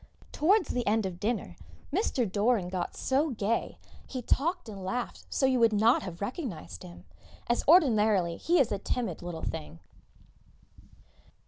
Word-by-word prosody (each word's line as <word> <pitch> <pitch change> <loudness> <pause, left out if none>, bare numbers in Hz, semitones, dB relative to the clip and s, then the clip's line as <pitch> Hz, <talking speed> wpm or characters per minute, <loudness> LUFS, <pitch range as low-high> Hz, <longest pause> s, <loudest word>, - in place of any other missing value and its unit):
Towards 390 +9 +3
the 245 -1 -2
end 215 0 +2
of 180 -2 -5
dinner 225 +3 -2 0.4
Mr. 315 - +1
Doran 205 -1 +1
got 180 -1 -4
so 280 +4 +1
gay, 225 -2 -1 0.3
he 255 -2 -5
talked 335 +6 0
and 200 -3 -8
laughed 240 +6 -4
so 270 - +1
you 260 -1 +3
would 230 -2 +4
not 220 +4 +4
have 180 -2 -8
recognised 195 - -5
him, 85 +1 -12 0.4
as 240 - +1
ordinarily 215 - +4
he 345 +1 +2
is 255 - +3
a 200 - -1
timid 210 -4 -3
little 175 -2 -6
thing. 155 - -5
220 Hz, 150 wpm, -29 LUFS, 185-260 Hz, 0.4 s, would